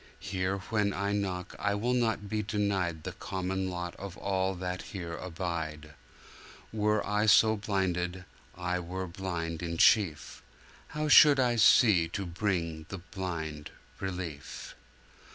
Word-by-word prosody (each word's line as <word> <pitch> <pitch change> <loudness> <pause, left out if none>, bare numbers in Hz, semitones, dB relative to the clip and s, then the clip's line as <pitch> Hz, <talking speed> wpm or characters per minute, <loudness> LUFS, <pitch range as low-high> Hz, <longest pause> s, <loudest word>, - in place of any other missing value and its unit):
Here 95 0 -2
when 105 -2 +1
I 100 +1 -1
knock 95 -3 -2
I 100 0 0
will 120 +5 0
not 110 -4 0
be 105 +1 -1
denied 95 -6 -1
The - - -4
common 95 0 -3
lot 90 -1 -5
of 100 -2 -8
all 95 -1 -1
that 90 0 -4 0.2
here 85 -2 -5
abide; 80 -4 -5 0.8
Were 105 0 +1
I 105 +1 +1
so 110 +1 +6
blinded, 95 -3 -2 0.3
I 90 0 -1
were 90 +2 -4
blind 85 -2 -4
in 85 -1 -3
chief: 90 -5 +3 0.6
How 155 0 0
should 150 -2 +8
I 125 -2 +3
see 105 -6 +6
to 100 - -3
bring 85 -3 -2
the 95 - -5
blind 85 -5 -5 0.3
relief? 90 -7 -6
95 Hz, 135 wpm, -30 LUFS, 85-105 Hz, 0.8 s, should